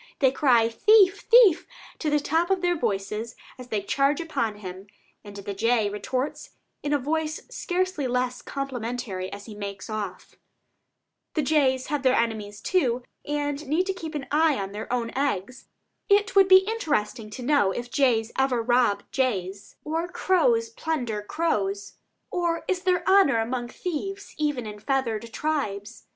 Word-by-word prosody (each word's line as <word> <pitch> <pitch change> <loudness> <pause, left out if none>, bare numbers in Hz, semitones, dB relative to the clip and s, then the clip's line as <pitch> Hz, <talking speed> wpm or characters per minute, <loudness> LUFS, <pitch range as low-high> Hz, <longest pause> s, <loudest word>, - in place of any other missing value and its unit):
They 265 -3 +4
cry 250 -5 +4
"Thief, 400 - +5
thief!" 460 -8 +6 0.3
to 310 - -1
the 295 0 +3
top 325 +5 0
of 385 -1 +1
their 350 0 +2
voices 215 - -3 0.2
as 250 - -9
they 210 -4 -2
charge 275 +6 +1
upon 235 -10 -2
him, 190 -1 -9 0.4
and 205 -1 -11
the 200 0 -5
jay 220 0 +1
retorts 260 +8 -3 0.3
in 290 - -3
a 290 - +4
voice 310 +3 -2
scarcely 370 - -1
less 250 0 -1
complimentary 245 -8 -4
as 200 0 -8
he 220 - -9
makes 200 +1 -7
off. 205 -4 -6 1.0
The 310 - +1
jays 265 -3 +2
have 290 - 0
their 260 -1 +3
enemies 215 -3 -2
also, 255 -9 +2 0.2
and 290 0 -2
need 320 +6 +1
to 385 - -1
keep 330 -4 -7
an 280 -2 -3
eye 305 -1 +3
on 195 0 -4
their 210 +3 -6
own 235 -2 -1
eggs. 255 -3 -2 0.4
It 405 0 +3
would 390 -1 +7
be 380 +1 +7
interesting 260 - -1
to 245 +4 -8
know 255 -7 +3
if 240 +4 -5
jays 235 -5 +2
ever 265 -2 +2
rob 240 -4 +2
jays, 200 -7 -2
or 325 +3 -2
crows 455 +6 +2
plunder 300 - -2
crows; 205 -7 -2 0.3
or 340 -2 -1
is 370 -1 0
there 365 -1 +1
honor 380 -10 +5
among 240 +2 -2
thieves 370 +8 -5
even 295 -6 -1
in 210 -1 -7
the - - -17
feathered 230 -3 -1
tribes? 235 -9 -3
260 Hz, 165 wpm, -25 LUFS, 220-320 Hz, 1.0 s, would